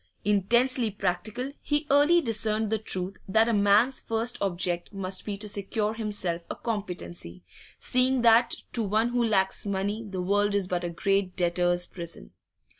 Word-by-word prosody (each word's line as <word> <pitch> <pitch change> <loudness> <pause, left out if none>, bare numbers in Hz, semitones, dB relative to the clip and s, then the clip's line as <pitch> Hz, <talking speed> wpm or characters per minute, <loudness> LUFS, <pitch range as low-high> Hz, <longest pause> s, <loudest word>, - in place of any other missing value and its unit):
Intensely 235 +4 +2
practical, 205 +6 -3
he 295 +1 -1
early 295 +5 +5
discerned 220 -3 -1
the 220 - +1
truth 190 -2 -3
that 220 +4 +3
a 235 - +1
man's 210 +5 +3
first 230 +2 -1
object 175 -2 -1
must 190 -2 -4
be 205 -2 -4
to 210 +1 -4
secure 210 +1 -2
himself 205 -6 -3
a - - -4
competency, 175 - -5 0.3
seeing 255 0 +1
that 235 +1 +5 0.2
to 235 - +3
one 215 +3 +1
who 240 0 +1
lacks 190 -4 +1
money 200 +2 -2
the 195 -4 -6
world 205 +2 +1
is 200 -2 +1
but 180 -1 -2
a 175 - -2
great 195 +1 0
debtors' 175 0 +1
prison. 165 - -7
205 Hz, 160 wpm, -27 LUFS, 185-225 Hz, 0.3 s, early